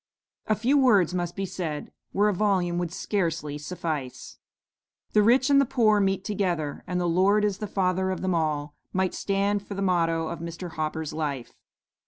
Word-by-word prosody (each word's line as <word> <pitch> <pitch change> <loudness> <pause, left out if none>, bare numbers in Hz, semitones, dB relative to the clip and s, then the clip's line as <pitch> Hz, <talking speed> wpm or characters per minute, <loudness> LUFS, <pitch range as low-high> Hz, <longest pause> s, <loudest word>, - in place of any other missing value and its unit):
A 215 - +3
few 255 +7 +2
words 205 - +4
must 175 -1 -2
be 195 - -2
said 160 -5 -5 0.2
where 205 +1 +2
a 210 - +2
volume 180 -3 +1
would 175 -2 -2
scarcely 165 -6 -2
suffice. 150 -5 -5 0.7
"'The 210 - +5
rich 255 +6 +4
and 280 0 +6
the - - +4
poor 215 -4 +3
meet 195 -1 0
together, 175 -8 -2
and 180 0 -1
the 175 - 0
Lord 195 +5 +3
is 200 -2 -1
the 210 - -3
Father 190 -1 0
of 185 - -3
them 185 -1 +1
all,' 150 -3 -1 0.2
might 185 -1 +1
stand 200 +1 0
for 200 0 -8
the 195 - -3
motto 165 -3 +1
of 170 - -5
Mr. 170 +1 -6
Hopper's 155 0 -3
life. 145 -6 -3
185 Hz, 185 wpm, -26 LUFS, 165-205 Hz, 0.7 s, and